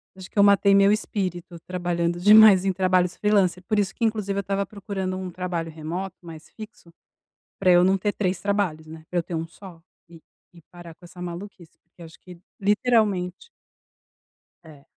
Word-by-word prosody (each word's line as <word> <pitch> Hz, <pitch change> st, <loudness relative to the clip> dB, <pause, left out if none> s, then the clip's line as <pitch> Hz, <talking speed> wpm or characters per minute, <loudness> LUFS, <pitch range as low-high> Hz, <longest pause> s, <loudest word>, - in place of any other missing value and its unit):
eu -, -, -17 dB
acho 185 Hz, -, -10 dB
que -, -, -17 dB
eu 200 Hz, -, +6 dB
matei 200 Hz, 0 st, +5 dB
meu 200 Hz, +1 st, +5 dB
espírito 185 Hz, -5 st, -3 dB
trabalhando 175 Hz, -1 st, -2 dB
demais 205 Hz, -1 st, +7 dB
em 190 Hz, -, +2 dB
trabalhos 185 Hz, -1 st, +1 dB
freelancer, 195 Hz, -4 st, +1 dB
por 210 Hz, +3 st, -1 dB
isso 195 Hz, -1 st, -1 dB
que, 230 Hz, -, -1 dB
inclusive, 210 Hz, -3 st, -2 dB
eu -, -, 0 dB
estava 195 Hz, +1 st, -2 dB
procurando 195 Hz, -2 st, -5 dB
um 185 Hz, -1 st, -6 dB
trabalho 170 Hz, -2 st, -4 dB
remoto, 170 Hz, +4 st, -6 dB
mais 165 Hz, -2 st, -12 dB
fixo, 215 Hz, -6 st, -13 dB, 0.7 s
pra 185 Hz, -2 st, +2 dB
eu 175 Hz, 0 st, +5 dB
não 190 Hz, +1 st, +3 dB
ter 205 Hz, +2 st, -1 dB
3 185 Hz, -4 st, -2 dB
trabalhos, 195 Hz, -6 st, -2 dB
né, 160 Hz, 0 st, -11 dB
pra 180 Hz, -, -1 dB
eu -, -, -3 dB
ter 170 Hz, -, -6 dB
um 165 Hz, +1 st, -4 dB
só 170 Hz, -1 st, -14 dB, 0.3 s
e 165 Hz, -1 st, -14 dB, 0.3 s
e 170 Hz, -, -17 dB
parar 175 Hz, -2 st, -12 dB
com 175 Hz, -, -18 dB
essa 180 Hz, +1 st, -13 dB
maluquice, 175 Hz, 0 st, -9 dB
porque 170 Hz, +1 st, -22 dB
acho 160 Hz, 0 st, -14 dB
que 180 Hz, -2 st, -14 dB, 0.2 s
literalmente 210 Hz, -, 0 dB, 1.2 s
É. 150 Hz, -3 st, -16 dB
185 Hz, 190 wpm, -24 LUFS, 170-200 Hz, 1.2 s, demais